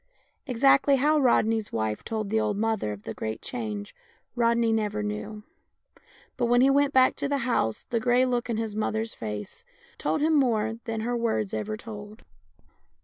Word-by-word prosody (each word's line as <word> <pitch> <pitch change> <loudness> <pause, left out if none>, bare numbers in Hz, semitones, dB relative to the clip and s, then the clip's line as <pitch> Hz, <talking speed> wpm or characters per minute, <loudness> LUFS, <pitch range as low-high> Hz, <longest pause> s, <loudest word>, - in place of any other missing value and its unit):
Exactly 275 +2 +4
how 300 +3 +3
Rodney's 225 -4 +2
wife 110 -1 -2
told 215 -2 -3
the 220 - +2
old 215 -2 0
mother 220 - 0
of 105 0 -8
the 110 - -5
great 110 0 -4
change 215 -4 -5 0.4
Rodney 235 -1 +2
never 210 -1 -1
knew; 210 0 -5 0.9
but 240 - +1
when 245 +1 +4
he 270 +1 +5
went 285 0 +3
back 260 -2 +4
to 280 - -1
the 285 - +1
house 110 - 0
the 235 - 0
grey 245 +2 +3
look 245 -1 -1
in 230 - -1
his 220 -2 -3
mother's 220 +1 -1
face 105 - -6 0.4
told - - 0
him 315 +1 +3
more 225 -6 +1
than 225 -2 -3
her 240 +2 -1
words 225 -3 -1
ever 215 0 -3
told. 215 -1 -10
225 Hz, 175 wpm, -26 LUFS, 210-245 Hz, 0.9 s, he